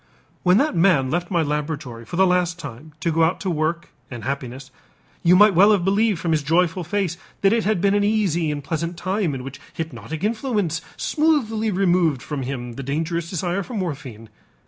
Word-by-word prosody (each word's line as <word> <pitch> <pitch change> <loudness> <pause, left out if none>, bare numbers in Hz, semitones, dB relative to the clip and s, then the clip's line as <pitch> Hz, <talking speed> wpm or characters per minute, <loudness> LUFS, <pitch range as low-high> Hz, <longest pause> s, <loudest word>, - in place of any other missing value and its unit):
When 180 +1 +4
that 285 -3 +1
man 165 -7 +3
left 175 +1 -1
my 170 -3 +1
laboratory 145 -6 -4
for 170 - -7
the 190 +2 +5
last 180 -1 +1
time 150 0 -9
to 170 - +1
go 165 +1 +2
out 165 +3 +1
to 190 - -1
work 165 +2 -1 0.2
and 120 -3 -7
happiness, 135 -1 -5 0.5
you 175 +1 +5
might 205 +2 +7
well 195 +5 +6
have 185 -4 +1
believed 205 +1 +2
from 170 0 -2
his 155 -2 +2
joyful 170 +4 +1
face 180 -1 -1 0.2
that 195 +1 +4
it 230 -1 +1
had 215 -4 +1
been 200 0 +3
an 205 0 +2
easy 195 -7 +1
and 145 -1 -3
pleasant 165 +3 -3
time 185 -3 -1
in 130 - -6
which 135 0 -9
hypnotic 160 0 -6
influence 210 - -1 0.2
smoothly 245 -9 +1
removed 180 -7 +2
from 145 -3 -4
him 125 -2 -4
the 135 - -7
dangerous 160 +5 -2
desire 180 +2 -1
for 235 +5 -7
morphine. 140 - -5
170 Hz, 195 wpm, -22 LUFS, 150-195 Hz, 0.5 s, might